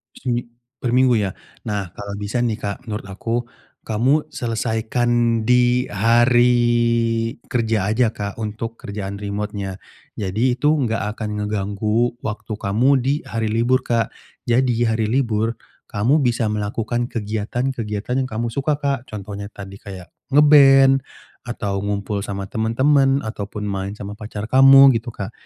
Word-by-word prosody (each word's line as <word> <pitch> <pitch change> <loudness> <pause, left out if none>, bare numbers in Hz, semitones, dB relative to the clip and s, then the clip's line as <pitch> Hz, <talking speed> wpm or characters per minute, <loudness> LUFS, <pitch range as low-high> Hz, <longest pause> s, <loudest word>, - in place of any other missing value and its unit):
Semi 120 -2 -2 0.3
perminggu 125 0 +3
ya? 100 -3 0 0.4
Nah, 100 -4 -3
kalau 100 0 -7
bisa 105 +3 -3
nih 120 -3 0
Kak, 100 -2 -3
menurut 105 -2 -5
aku, 115 +4 -3 0.5
kamu 130 +8 +1
selesaikan 115 0 0
di 125 +1 +3
hari 120 +4 +4 0.9
kerja 110 -4 0
aja 115 -1 +2
Kak, 100 0 -5
untuk 110 +1 -4
kerjaan 100 -1 -6
remote-nya. 100 -1 -4 0.4
Jadi, 110 +6 0
itu 145 +4 +1
enggak 120 -6 -1 0.2
akan 105 -1 -3
ngeganggu 105 +3 -1
waktu 110 +1 -4
kamu 110 +5 +1
di 135 +3 +1
hari 115 -1 -2
libur 120 +3 +2
Kak. 115 -2 0 0.4
Jadi, 120 -1 +2
hari 110 -1 0
libur, 115 -2 0 0.3
kamu 120 +9 +2
bisa 120 -5 +1
melakukan 110 +3 -2
kegiatan-kegiatan 110 +1 -3
yang 130 - -4
kamu 115 +1 -3
suka 140 +4 0
Kak, 140 -3 -2
contohnya 100 -1 -7
tadi 100 -1 -10
kayak 95 -2 -10 0.2
nge-band 135 -2 +7 0.5
atau 100 -5 -3
ngumpul 100 0 -2
sama 100 -1 -4
temen-temen, 135 +5 +2
ataupun 105 -1 -5
main 100 0 -3
sama 100 -1 -7
pacar 105 0 -6
kamu, 135 +1 +8
gitu 115 0 -9
Kak. 100 +1 -5
115 Hz, 135 wpm, -21 LUFS, 105-125 Hz, 0.9 s, kamu